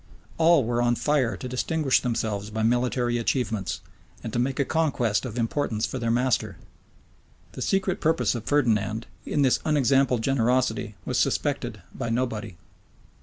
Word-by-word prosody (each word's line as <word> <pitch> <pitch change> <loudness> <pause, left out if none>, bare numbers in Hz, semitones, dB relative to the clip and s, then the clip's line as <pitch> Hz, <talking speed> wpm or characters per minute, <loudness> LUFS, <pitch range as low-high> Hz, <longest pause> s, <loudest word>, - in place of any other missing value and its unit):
All 165 -3 +5
were 120 +1 0
on 120 0 +2
fire 135 -4 +1
to 130 - -6
distinguish 135 +2 +1
themselves 110 -4 -2
by 110 +1 -2
military 120 +1 +1
achievements, 110 - -1 0.4
and - - -5
to - - 0
make 135 +3 -1
a 140 - +2
conquest 135 -9 0
of 120 -2 -6
importance 115 -2 -1
for 130 - -4
their 115 -1 -1
master. 125 +1 +1 0.9
The - - -8
secret 190 -1 0
purpose 160 +1 +2
of 120 -3 -5
Ferdinand, 110 -6 +1 0.2
in 145 - +1
this 130 - +3
unexampled 135 -5 +2
generosity, 125 -4 +1
was - - 0
suspected - - -1
by 115 - -4
nobody. 115 -6 -2
125 Hz, 150 wpm, -25 LUFS, 115-135 Hz, 0.9 s, All